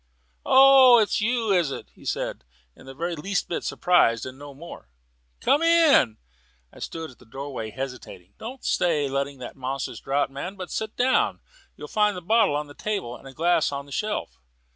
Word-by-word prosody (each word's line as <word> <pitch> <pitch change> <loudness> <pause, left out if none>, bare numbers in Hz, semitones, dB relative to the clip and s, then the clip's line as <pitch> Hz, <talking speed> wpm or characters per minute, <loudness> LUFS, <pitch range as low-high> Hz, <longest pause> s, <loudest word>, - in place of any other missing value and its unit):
"Oh, 265 -2 +8
it's 215 -1 +2
you, 230 -1 0
is 175 -6 +2
it?" - - -7
he - - -18
said, - - -3 0.3
just 130 - -17
the 135 - -10
very 170 +4 -3
least 195 +5 -2
bit 170 - -3
surprised 115 -11 +2
and 130 0 -8
no 145 +1 -11
more. 155 - -11 0.5
"Come 290 - +3
in." 330 - +4 0.6
I - - -14
stood 160 -3 -6
in 125 - -19
the - - -18
doorway 135 -3 -6
hesitating. 125 -7 -8
"Don't 250 +4 -8
stay 155 -5 +1
letting 140 +1 -2
in - - -20
that - - -8
monstrous 135 +1 -4
draught, 135 0 -1
man; 175 +8 -6
but 185 -2 -8
sit 220 -1 -4
down. 255 +1 +2 0.4
You'll - - -9
find 210 -2 +1
the - - -6
bottle 220 -5 +3
on 150 +1 -2
the 145 - -13
table 195 - -4
and 135 - -13
a - - -10
glass 170 -1 +2
on 140 0 -5
the 140 - -16
shelf." 210 +9 -3
165 Hz, 195 wpm, -25 LUFS, 135-215 Hz, 0.6 s, Oh